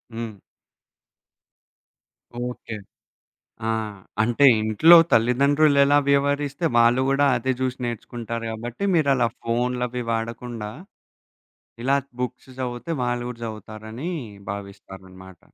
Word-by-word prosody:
హ్మ్. 115 -3 -6 2.0
ఓకే. 125 -2 -5 0.9
ఆ! - - 0 0.5
అంటే 120 +5 +3 0.2
ఇంట్లో 110 +11 +7 0.2
తల్లిదండ్రులు 140 +6 +4
ఎలా 145 +1 +4
వ్యవహరిస్తే 140 +2 +1
వాళ్ళు 120 +2 +5
గూడా 140 +1 +3
అదే 130 +3 -1
చూసి 130 -1 -1
నేర్చుకుంటారు 115 0 -5
గాబట్టి, 120 - -6
మీరలా 135 -7 +3
ఫోనులవి 125 +1 -1
వాడకుండా, 115 -1 -4 1.1
ఇలా 135 +2 +3 0.3
బుక్స్ 125 +1 -5
చదివితే 120 +4 -4
వాళ్ళు 120 0 -1
గూడా 120 -1 -8
చదువుతారని 110 +5 -7 0.4
భావిస్తారనమాట. 95 -2 -10
120 Hz, 95 wpm, -23 LUFS, 110-135 Hz, 2.0 s, ఇంట్లో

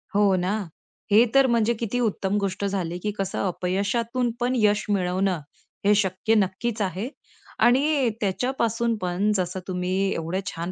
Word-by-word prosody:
हो 200 -2 +4
ना, 180 +1 0 0.6
हे 220 +4 +7
तर 275 -1 +6
म्हणजे 235 -1 +2
किती 235 +2 -2
उत्तम 205 -3 0
गोष्ट 195 0 -2
झाली 180 -3 -2
की 210 +3 -2
कसं 195 -1 -2
अपयशातून 225 +7 -1
पण 245 +1 0
यश 210 -1 +2
मिळवणं 185 -2 +1 0.5
हे 210 - +6
शक्य 200 +2 +1
नक्कीच 210 +3 0
आहे. 195 +6 -2 0.5
आणि, 270 0 +3
त्याच्यापासून 230 +2 0
पण 185 +3 0
जसं 185 0 -1
तुम्ही 180 0 -2 0.2
एवढ्या 165 +4 -2
छान 170 -2 -4
200 Hz, 145 wpm, -25 LUFS, 185-235 Hz, 0.6 s, हे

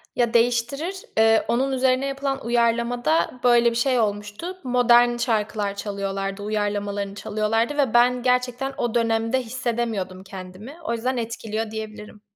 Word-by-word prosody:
Ya, 240 -2 +1
değiştirir, 245 +9 +1 0.2
eee, 225 0 +4
onun 265 +3 +1
üzerine 260 0 +2
yapılan 275 -1 -3
uyarlamada 240 +4 +1
böyle 240 -1 +5
bir - - -5
şey 250 +1 +2
olmuştu. 210 - -3
Modern 245 -1 +4
şarkılar 215 -3 -1
çalıyorlardı, 195 -1 -4
uyarlamalarını 205 -1 -2
çalıyorlardı 225 +7 -1
ve 270 -6 +1
ben 245 +1 +4
gerçekten 250 +1 0
o 240 -1 -2
dönemde 230 +2 +1
hissedemiyordum 225 -6 -3
kendimi. 190 - -10
O 235 - -2
yüzden 250 +3 -1
etkiliyor, 225 -1 -4
diyebilirim. 215 -1 -8
235 Hz, 130 wpm, -23 LUFS, 210-250 Hz, 0.2 s, böyle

